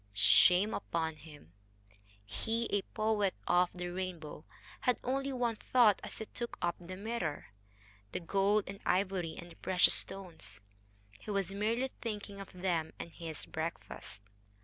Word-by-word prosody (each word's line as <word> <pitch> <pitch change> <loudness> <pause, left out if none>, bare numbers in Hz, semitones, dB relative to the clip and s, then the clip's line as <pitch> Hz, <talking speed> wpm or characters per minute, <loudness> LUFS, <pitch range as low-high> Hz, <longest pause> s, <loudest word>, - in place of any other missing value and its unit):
Shame 180 - +6
upon 160 -4 -1
him! 145 - -14 0.7
he, 225 - -1
a 205 - +3
poet 215 -3 +2
of 180 0 +4
the 180 0 -4
rainbow, 175 -4 -5 0.3
had 250 -1 +2
only 275 +2 0
one 240 -3 0
thought 230 -5 +5
as - - -5
he 220 - -3
took 235 +2 -5
up 175 -1 +1
the 185 +1 -7
mirror 200 - -3 0.6
the - - -2
gold 195 +4 +3
and 195 0 -7
ivory 185 -3 +1
and 175 0 -8
the - - -13
precious 185 -1 +5
stones. 170 - -5 0.6
He - - -10
was 195 -2 0
merely 230 +6 0
thinking 205 -3 -4
of 195 - -8
them 175 -3 -1
and 170 - -6
his 160 -2 -6
breakfast. 160 -9 -5
190 Hz, 150 wpm, -34 LUFS, 170-215 Hz, 0.7 s, Shame